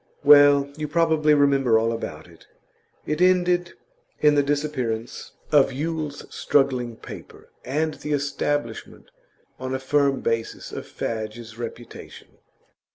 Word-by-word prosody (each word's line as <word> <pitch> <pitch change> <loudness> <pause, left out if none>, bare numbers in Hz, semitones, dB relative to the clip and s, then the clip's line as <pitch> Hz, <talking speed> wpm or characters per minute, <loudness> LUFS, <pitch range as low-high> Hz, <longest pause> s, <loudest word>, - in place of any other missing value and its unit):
Well, 145 -1 +7
you 155 -1 -3
probably 155 -1 +3
remember 135 -5 +3
all 115 +1 +1
about 115 - -6
it. - - -19 0.6
It 150 +3 -2
ended 180 -1 +2 0.5
in 150 -1 +4
the 145 - +4
disappearance 140 -6 -3 0.2
of 145 -3 +4
Yule's 150 +1 -4
struggling 130 -4 +1
paper, - - -12
and 155 +4 -1
the 150 - -5
establishment 145 -3 -3 0.5
on 130 +1 -3
a - - -3
firm 140 0 +1
basis 115 -1 -3
of - - -7
Fadge's 110 +1 -6
reputation. 120 0 -10
140 Hz, 120 wpm, -23 LUFS, 120-150 Hz, 0.6 s, Well